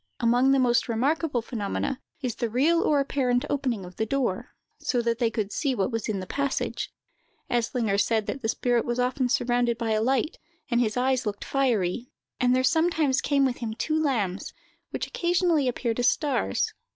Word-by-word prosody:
Among 245 Hz, +2 st, +3 dB
the 275 Hz, -, +4 dB
most 250 Hz, -1 st, +2 dB
remarkable 265 Hz, +2 st, 0 dB
phenomena, 240 Hz, +4 st, -3 dB, 0.2 s
is 250 Hz, -4 st, -1 dB
the 230 Hz, +1 st, -2 dB
real 305 Hz, +9 st, +3 dB
or 295 Hz, -2 st, +3 dB
apparent 255 Hz, -3 st, +1 dB
opening 255 Hz, -9 st, -1 dB
of 180 Hz, 0 st, -12 dB
the 220 Hz, -, 0 dB
door, 245 Hz, -7 st, -2 dB, 0.2 s
so 250 Hz, -, 0 dB
that 235 Hz, 0 st, 0 dB
they 235 Hz, -2 st, +2 dB
could 215 Hz, -2 st, -3 dB
see 275 Hz, -4 st, 0 dB
what 195 Hz, +1 st, 0 dB
was 225 Hz, -2 st, -3 dB
in 205 Hz, -3 st, -1 dB
the 185 Hz, -, -5 dB
passage. 280 Hz, +6 st, -2 dB, 0.6 s
Eslinger 230 Hz, -4 st, +1 dB
said 220 Hz, -1 st, +1 dB
that 265 Hz, -, -4 dB
the 220 Hz, -, -1 dB
spirit 240 Hz, 0 st, +1 dB
was 240 Hz, 0 st, -2 dB
often 250 Hz, +1 st, +1 dB
surrounded 240 Hz, -2 st, +1 dB
by 230 Hz, -2 st, -2 dB
a 215 Hz, 0 st, +2 dB
light, 265 Hz, +6 st, 0 dB, 0.3 s
and 240 Hz, 0 st, +3 dB
his 220 Hz, 0 st, 0 dB
eyes 255 Hz, -1 st, +1 dB
looked 205 Hz, -1 st, -4 dB
fiery; 245 Hz, -4 st, 0 dB, 0.3 s
and 250 Hz, 0 st, +3 dB
there 255 Hz, -, +2 dB
sometimes 320 Hz, -2 st, +2 dB
came 280 Hz, -1 st, +2 dB
with 255 Hz, -2 st, 0 dB
him 220 Hz, -2 st, -4 dB
two 310 Hz, +6 st, -1 dB
lambs, 210 Hz, -, -1 dB, 0.4 s
which -, -, -3 dB
occasionally 345 Hz, -5 st, +1 dB
appeared 240 Hz, -1 st, -1 dB
as 245 Hz, -, +5 dB
stars. 260 Hz, -, 0 dB
245 Hz, 190 wpm, -26 LUFS, 225-275 Hz, 0.6 s, as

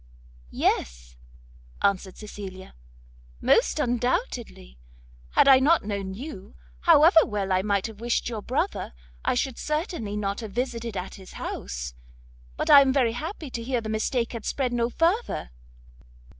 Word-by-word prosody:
"Yes," -, -, -1 dB, 0.7 s
answered 195 Hz, -1 st, 0 dB
Cecilia, 195 Hz, -3 st, -9 dB, 0.7 s
"most -, -, +3 dB
undoubtedly; 240 Hz, -, -2 dB, 0.5 s
had -, -, +5 dB
I 265 Hz, -1 st, +8 dB
not 305 Hz, +5 st, +4 dB
known 200 Hz, -2 st, -3 dB
you, 235 Hz, -5 st, -9 dB, 0.2 s
however 320 Hz, -, +7 dB
well 200 Hz, -3 st, -2 dB
I 185 Hz, 0 st, +3 dB
might 200 Hz, -1 st, 0 dB
have 220 Hz, -1 st, -8 dB
wished 240 Hz, 0 st, 0 dB
your 225 Hz, -3 st, -4 dB
brother, 290 Hz, -, -2 dB, 0.3 s
I -, -, +1 dB
should 255 Hz, -1 st, -1 dB
certainly 305 Hz, -, -3 dB
not 200 Hz, -1 st, -2 dB
have 220 Hz, -4 st, -7 dB
visited 235 Hz, -3 st, -3 dB
at 180 Hz, +1 st, -5 dB
his 185 Hz, -, -13 dB
house. -, -, -5 dB, 0.6 s
But -, -, +1 dB
I 285 Hz, -1 st, +11 dB
am 270 Hz, -1 st, +3 dB
very 260 Hz, -4 st, +2 dB
happy 305 Hz, -, -6 dB
to 235 Hz, -, -4 dB
hear 245 Hz, +1 st, -1 dB
the 220 Hz, -1 st, -6 dB
mistake 230 Hz, +3 st, -1 dB
had 230 Hz, -2 st, -6 dB
spread 255 Hz, -3 st, -1 dB
no 235 Hz, 0 st, +1 dB
further." 335 Hz, -, 0 dB
230 Hz, 145 wpm, -26 LUFS, 195-265 Hz, 0.7 s, I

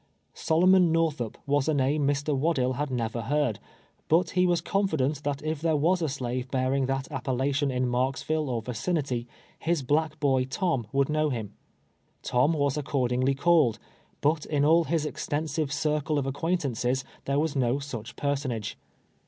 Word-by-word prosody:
Solomon 180 Hz, +1 st, +4 dB
Northup 155 Hz, -8 st, 0 dB
was 145 Hz, -1 st, +1 dB
a 155 Hz, -, +2 dB
name 140 Hz, +1 st, +1 dB
^Iv. 145 Hz, 0 st, +1 dB, 0.2 s
AVaddlll 130 Hz, -6 st, +1 dB
had 145 Hz, 0 st, -1 dB
never 115 Hz, -2 st, -2 dB
heard, 145 Hz, -3 st, 0 dB, 0.5 s
but 165 Hz, +2 st, +2 dB
lie 180 Hz, 0 st, +4 dB
was 175 Hz, -1 st, +2 dB
confident 155 Hz, -7 st, 0 dB
that 145 Hz, 0 st, -2 dB
if 155 Hz, -1 st, -2 dB
there 160 Hz, -1 st, +2 dB
was 170 Hz, +5 st, +2 dB
a 160 Hz, -, 0 dB
slave 130 Hz, -1 st, -3 dB
bearing 130 Hz, 0 st, 0 dB
that 135 Hz, 0 st, -2 dB
a])pellation 135 Hz, +1 st, 0 dB
in 125 Hz, 0 st, 0 dB
Marksville 135 Hz, +4 st, -1 dB
or 115 Hz, -3 st, -2 dB
vi 125 Hz, -, -5 dB
cinity, 130 Hz, -, -2 dB, 0.3 s
his 165 Hz, -3 st, 0 dB
black 155 Hz, +3 st, 0 dB
boy 135 Hz, -3 st, +2 dB
Tom 135 Hz, -, -1 dB
would 140 Hz, 0 st, +2 dB
know 155 Hz, 0 st, +1 dB
him. 115 Hz, -6 st, -4 dB, 0.7 s
Tom 125 Hz, +6 st, +2 dB
was 145 Hz, -2 st, 0 dB
accordingly 130 Hz, -2 st, 0 dB
called, 145 Hz, -6 st, +3 dB, 0.4 s
but 150 Hz, +1 st, +2 dB
in 145 Hz, -2 st, +1 dB
all 165 Hz, +2 st, +5 dB
his 160 Hz, -2 st, 0 dB
extensive 150 Hz, 0 st, -2 dB
cir 150 Hz, 0 st, 0 dB
cle 150 Hz, +1 st, -1 dB
of 140 Hz, -, 0 dB
acquaintances 135 Hz, -4 st, -1 dB, 0.2 s
there 140 Hz, 0 st, 0 dB
was 150 Hz, 0 st, 0 dB
no 125 Hz, -2 st, +2 dB
sudi 120 Hz, -5 st, -6 dB
personage. 135 Hz, -7 st, -2 dB
140 Hz, 165 wpm, -27 LUFS, 130-155 Hz, 0.7 s, all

